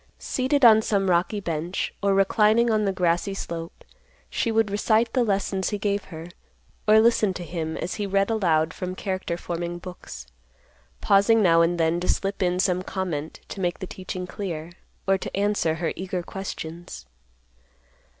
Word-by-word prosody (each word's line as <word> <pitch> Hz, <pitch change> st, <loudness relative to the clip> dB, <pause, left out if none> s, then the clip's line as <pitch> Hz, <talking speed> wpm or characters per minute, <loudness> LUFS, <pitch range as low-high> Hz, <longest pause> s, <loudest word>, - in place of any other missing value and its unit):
Seated 260 Hz, +1 st, +1 dB
on 220 Hz, -2 st, +8 dB
some 195 Hz, -3 st, +1 dB
rocky 180 Hz, +5 st, +1 dB
bench, 170 Hz, -1 st, -3 dB
or 200 Hz, -1 st, +2 dB
reclining 215 Hz, +4 st, +3 dB
on 215 Hz, -1 st, +2 dB
the 195 Hz, -, +1 dB
grassy 180 Hz, +1 st, 0 dB
slope, 165 Hz, -3 st, -6 dB, 0.5 s
she 230 Hz, -, 0 dB
would 220 Hz, -2 st, +2 dB
recite 220 Hz, +3 st, +2 dB
the 255 Hz, -, +3 dB
lessons 195 Hz, -3 st, 0 dB
he 210 Hz, -, -2 dB
gave 200 Hz, 0 st, -1 dB
her, 160 Hz, -3 st, -9 dB, 0.6 s
or 215 Hz, +1 st, +7 dB
listen 220 Hz, -4 st, +3 dB
to 180 Hz, -, -5 dB
him, 160 Hz, -1 st, -4 dB
as 180 Hz, -, -3 dB
he 205 Hz, -, -1 dB
read 195 Hz, +2 st, +1 dB
aloud 165 Hz, -6 st, +2 dB
from 185 Hz, -1 st, -5 dB
character 185 Hz, -3 st, -3 dB
forming 175 Hz, 0 st, -4 dB
books, 175 Hz, -, -9 dB, 0.8 s
pausing 205 Hz, +3 st, +4 dB
now 165 Hz, -2 st, +5 dB
and 170 Hz, +1 st, +1 dB
then 165 Hz, +1 st, +2 dB
to 180 Hz, -, -4 dB
slip 195 Hz, +1 st, -1 dB
in 180 Hz, -1 st, +1 dB
some 185 Hz, -1 st, +2 dB
comment 175 Hz, -6 st, -4 dB
to 195 Hz, -, -7 dB
make 175 Hz, -2 st, 0 dB
the -, -, -6 dB
teaching 185 Hz, 0 st, -6 dB
clear, 175 Hz, -4 st, -5 dB, 0.4 s
or 195 Hz, 0 st, +3 dB
to -, -, -5 dB
answer 200 Hz, -6 st, +1 dB
her 165 Hz, 0 st, -2 dB
eager 185 Hz, -1 st, -4 dB
questions. 170 Hz, -, -7 dB
190 Hz, 170 wpm, -25 LUFS, 170-205 Hz, 0.8 s, on